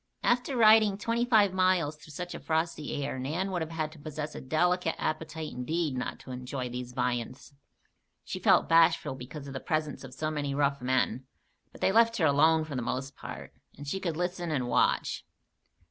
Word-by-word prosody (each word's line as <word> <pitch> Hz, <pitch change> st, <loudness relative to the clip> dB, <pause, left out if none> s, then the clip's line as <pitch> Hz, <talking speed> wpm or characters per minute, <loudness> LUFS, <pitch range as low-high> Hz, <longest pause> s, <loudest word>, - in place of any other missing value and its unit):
After 245 Hz, +2 st, +1 dB
riding 215 Hz, -3 st, +6 dB
twenty 230 Hz, +3 st, 0 dB
five 215 Hz, -6 st, +4 dB
miles 185 Hz, -5 st, +2 dB
through 150 Hz, -, -16 dB
such 175 Hz, +4 st, -5 dB
a -, -, -6 dB
frosty 160 Hz, -3 st, -2 dB
air, 130 Hz, -, -4 dB
Nan 165 Hz, +9 st, -2 dB
would 180 Hz, -2 st, -1 dB
have 160 Hz, -, -3 dB
had 155 Hz, -2 st, -3 dB
to 155 Hz, -, -14 dB
possess 150 Hz, 0 st, -5 dB
a -, -, -7 dB
delicate 165 Hz, +4 st, +1 dB
appetite 155 Hz, 0 st, -3 dB
indeed 150 Hz, +3 st, -2 dB
not 125 Hz, -, -3 dB
to 130 Hz, -, -10 dB
enjoy 125 Hz, 0 st, -4 dB
these 125 Hz, 0 st, -6 dB
viands. 125 Hz, +2 st, -3 dB, 0.7 s
She -, -, -5 dB
felt -, -, +4 dB
bashful 165 Hz, -4 st, +4 dB
because 135 Hz, +3 st, -8 dB
of 140 Hz, -, -8 dB
the 135 Hz, -, -4 dB
presence 155 Hz, -3 st, -2 dB
of 130 Hz, -1 st, -10 dB
so 155 Hz, +2 st, -2 dB
many 145 Hz, -2 st, -2 dB
rough 140 Hz, -1 st, +1 dB
men; 130 Hz, 0 st, 0 dB, 0.4 s
but -, -, -15 dB
they -, -, +3 dB
left 230 Hz, +2 st, +4 dB
her 165 Hz, -, +2 dB
alone 155 Hz, +2 st, +4 dB
for 155 Hz, -3 st, -6 dB
the 125 Hz, -, -1 dB
most 135 Hz, +3 st, -3 dB
part, -, -, -9 dB, 0.2 s
and 145 Hz, +1 st, -9 dB
she 190 Hz, +7 st, -2 dB
could 170 Hz, -5 st, -3 dB
listen 175 Hz, -1 st, -2 dB
and 135 Hz, -5 st, -1 dB
watch. -, -, +1 dB
155 Hz, 195 wpm, -29 LUFS, 135-180 Hz, 0.7 s, riding